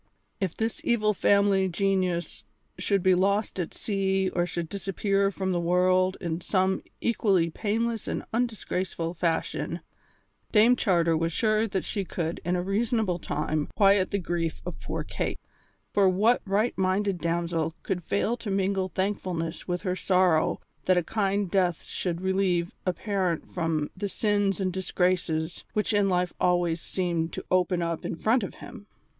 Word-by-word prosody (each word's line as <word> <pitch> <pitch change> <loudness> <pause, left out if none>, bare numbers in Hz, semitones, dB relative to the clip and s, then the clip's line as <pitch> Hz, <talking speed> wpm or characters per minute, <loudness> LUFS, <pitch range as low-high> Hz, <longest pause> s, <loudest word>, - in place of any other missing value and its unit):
If 190 -4 -2
this 225 0 -2
evil 215 -3 +2
family 200 -1 +3
genius 185 -1 -1 0.4
should 200 -3 +1
be 185 - +5
lost 200 +2 +1
at 170 - -3
sea 195 -2 0
or 175 -1 0
should 170 -1 -3
disappear 195 +2 0
from 190 -1 -2
the 175 - +1
world 185 +2 +2
in 170 -2 -3
some 190 +1 +1 0.2
equally 195 -7 +2
painless 225 +4 -1
and - - -3
undisgraceful 190 -7 -2
fashion, 165 -1 -1 0.7
Dame 225 +3 +6
Charter 170 -8 +2
was 165 +1 0
sure 215 +4 +2
that 190 -2 -2
she 200 - -2
could 170 -2 -3
in 180 +2 0
a 175 - -1
reasonable 210 -2 0
time 150 -1 -2
quiet 195 -2 +5
the 200 - 0
grief 170 -3 -2
of - - -6
poor - - -3
Kate; - - -3 0.5
for 195 -2 +5
what 215 +6 +3
right 210 +4 +1
minded 190 0 +1
damsel 165 -1 -1
could 180 -2 -2
fail 210 +7 0
to 230 -3 -6
mingle 195 -1 0
thankfulness 180 -3 -2
with 180 0 -2
her 185 -2 0
sorrow 180 -4 +2 0.3
that 185 -1 +4
a 175 - +2
kind 200 0 0
death 180 -4 +1
should 175 -2 -3
relieve 190 -2 +1 0.2
a 185 - +3
parent 190 -5 -2
from 165 -4 -1
the 200 +1 -3
sins 205 -1 +1
and 185 -2 -1
disgraces 180 -3 0
which 210 +1 0
in 205 -1 +3
life 180 -1 +1
always 175 -2 +2
seemed 170 -3 -1
to - - -6
open 180 -1 +2
up 165 -1 -2
in - - -3
front 225 +9 +2
of 195 - -5
him. 215 -4 -11
185 Hz, 160 wpm, -27 LUFS, 175-200 Hz, 0.7 s, Dame